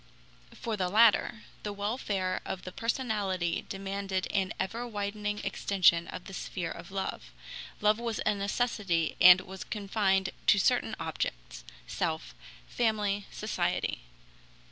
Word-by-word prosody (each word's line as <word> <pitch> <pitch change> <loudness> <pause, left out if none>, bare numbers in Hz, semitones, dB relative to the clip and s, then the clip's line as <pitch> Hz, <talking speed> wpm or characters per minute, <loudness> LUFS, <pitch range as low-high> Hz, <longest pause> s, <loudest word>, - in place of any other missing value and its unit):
For 225 -2 -3
the 185 -3 -1
latter, 225 +2 +4 0.2
the 210 - -4
welfare 200 -2 -2
of 185 - -5
the 185 - -7
personality 205 -7 -1
demanded 195 -1 -2
an 195 -1 +1
ever 235 +5 -2
widening 205 -1 -3
extension 175 -4 +3
of 180 - -7
the 195 - -9
sphere 180 -2 -4
of 170 +1 -9
love; 195 0 -4 0.5
love 210 +1 +4
was 235 -2 -2
a 215 - +4
necessity 200 -4 0
and 180 +1 +10
was 190 0 -8
confined 195 -2 0 0.2
to 205 - +7
certain 190 - +2
objects - - -4 0.2
self, 160 -2 -3 0.3
family, 210 -4 0
society. - - -1
200 Hz, 125 wpm, -30 LUFS, 185-210 Hz, 0.5 s, and